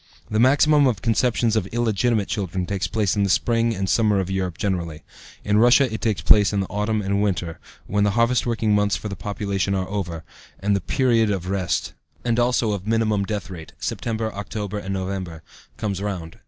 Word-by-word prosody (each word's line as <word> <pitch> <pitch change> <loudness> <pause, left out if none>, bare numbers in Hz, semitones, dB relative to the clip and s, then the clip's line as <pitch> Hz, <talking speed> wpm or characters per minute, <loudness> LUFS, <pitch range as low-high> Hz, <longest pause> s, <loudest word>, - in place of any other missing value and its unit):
The 110 - +1
maximum 145 +3 +5
of 105 -7 -1
conceptions 115 -1 +1
of 105 -4 0
illegitimate 115 -1 0
children 95 -2 -2
takes 100 +1 -2
place 105 -2 0
in 100 - +1
the 100 - +1
spring 115 +3 +2
and 95 0 -2
summer 105 -1 +2
of 95 0 -2
Europe 95 -3 -2
generally; 85 -6 -3 0.4
in 105 +1 +2
Russia 120 +1 +5
it 110 - -4
takes 105 -5 -1
place 105 +1 +5
in 100 - 0
the 95 - 0
autumn 105 +1 -1
and 100 +1 0
winter, 90 -5 -2 0.3
when 105 +1 0
the 105 - +3
harvest 115 +1 +2
working 115 -2 +1
months 105 0 +2
for 105 - -5
the 100 - -5
population 100 -1 -2
are 95 -1 -2
over, 85 -5 -4 0.4
and 100 +1 +1
the 100 - -1
period 115 - +2
of 95 -2 -2
rest, 95 -3 -1 0.3
and 120 0 +1
also 120 -2 +2
of 100 -1 -4
minimum 110 -3 +1
deathrate 95 -6 -6
(September, 110 -1 -3
October, 105 0 -5
and 100 -1 -4
November), 95 -4 -5 0.3
comes 100 -3 -3
round. 90 -5 -5
105 Hz, 195 wpm, -23 LUFS, 95-115 Hz, 0.4 s, maximum